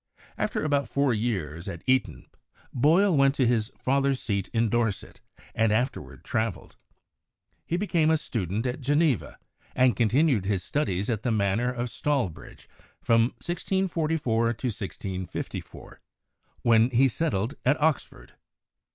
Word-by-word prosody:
After - - -2
about 145 -2 0
four 140 -2 +1
years 95 - -3
at 85 -3 -6
Eton, 130 0 0 0.5
Boyle 165 +8 +4
went 140 0 +4
to 130 - +2
his 115 -3 +2
father's 135 0 +1
seat 100 -3 -2
in 115 0 +1
Dorset 115 -2 -2 0.3
and 110 -1 +2
afterward 125 +5 -2
traveled. 110 -7 -3 0.9
He 170 - 0
be 200 - -1
came 165 -5 +2
a 160 - +4
student 110 - -3
at 125 +3 -3
Geneva 145 - +1 0.4
and 125 -3 +4
continued 120 - +2
his 95 -2 -1
studies 100 - -1
at 115 -4 -1
the 125 - -1
manor 110 +3 +1
of 120 -1 -4
Stalbridge 135 - -3 0.3
from 115 0 +3 0.2
1644 160 - 0
to 120 +3 -4
1654, 95 -4 -6 0.6
when 115 0 +5
he 130 +2 +4
settled 120 -4 -1
at 140 +4 +2
Oxford. 155 -3 -1
120 Hz, 135 wpm, -26 LUFS, 110-145 Hz, 0.9 s, when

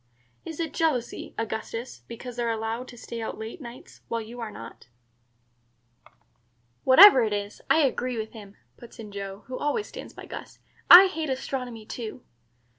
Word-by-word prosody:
"Is 325 -1 -7
it 330 -2 -3
jealousy, 295 -8 -1
Augustus, 225 - -5
because 245 +1 -8
they - - -1
are 235 - 0
allowed 225 +2 -3
to 240 - -12
stay 230 0 -7
out 220 - -5
late 220 +9 -7
nights, 240 -1 -12
while 230 - -2
you 230 +2 -9
are 230 -2 -4
not?" 115 - -11 2.0
"Whatever 265 +1 +9
it 215 -2 0
is, 205 0 -4
I 320 - +5
agree 255 -3 0
with 220 0 -4
him," 205 -3 -12 0.2
puts 240 - -14
in 215 -3 -9
Joe, 200 0 -7
who 255 0 -6
always 295 +9 -1
stands - - -10
by - - -10
Gus. - - -9 0.3
"I 360 +2 +12
hate 320 -5 -3
astronomy 250 -4 -4
too." 235 +2 -7
235 Hz, 170 wpm, -26 LUFS, 220-260 Hz, 2.0 s, I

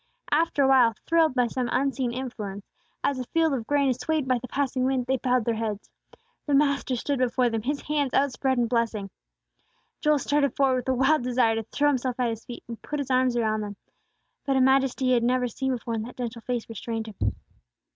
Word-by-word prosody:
After 300 -2 +2
awhile, 255 -4 +5
thrilled 325 -4 +3
by 250 -1 +3
some 245 +1 -2
unseen 265 -1 0
influence, 215 -6 -6 0.4
as 275 -2 0
a - - -2
field 325 +2 +1
of 235 -4 -3
grain 285 -1 +2
is 255 -1 0
swayed 310 0 -1
by 255 -1 +2
the 255 - -8
passing 260 0 -1
wind, 260 -1 +1
they 265 +1 +1
bowed 250 -2 +1
their 235 - +1
heads. 220 -2 -4 0.6
The 290 - +3
Master 280 -3 +2
stood 275 +3 -2
before 250 -1 +2
them, 225 -1 -1
His 280 +5 -2
hands 290 -3 0
outspread 265 -1 +1
in 240 - +3
blessing. 230 -4 -1 0.9
Joel 300 -1 +3
started 280 -1 +1
forward 270 -2 +3
with 250 +1 -3
a - - +3
wild 270 +4 +3
desire 245 -2 +2
to 225 - -1
throw 285 +6 0
himself 255 -2 -1
at 245 -2 +1
His 225 0 -7
feet, 240 - -9
and 230 -1 -8
put 295 - -4
his 280 -2 -3
arms 255 -1 +2
around 215 -2 +1
them; 205 -1 -5 0.7
but 275 -1 +1
a - - +4
majesty 265 0 +3
he 255 - +3
had 240 - +3
never 250 +1 +1
seen 265 +3 -2
before 235 -2 -3
in 225 - -1
that 235 +3 -8
gentle 235 -2 -5
face 240 -1 -3
restrained 225 0 -4
him. 205 - -2
255 Hz, 215 wpm, -26 LUFS, 235-275 Hz, 0.9 s, awhile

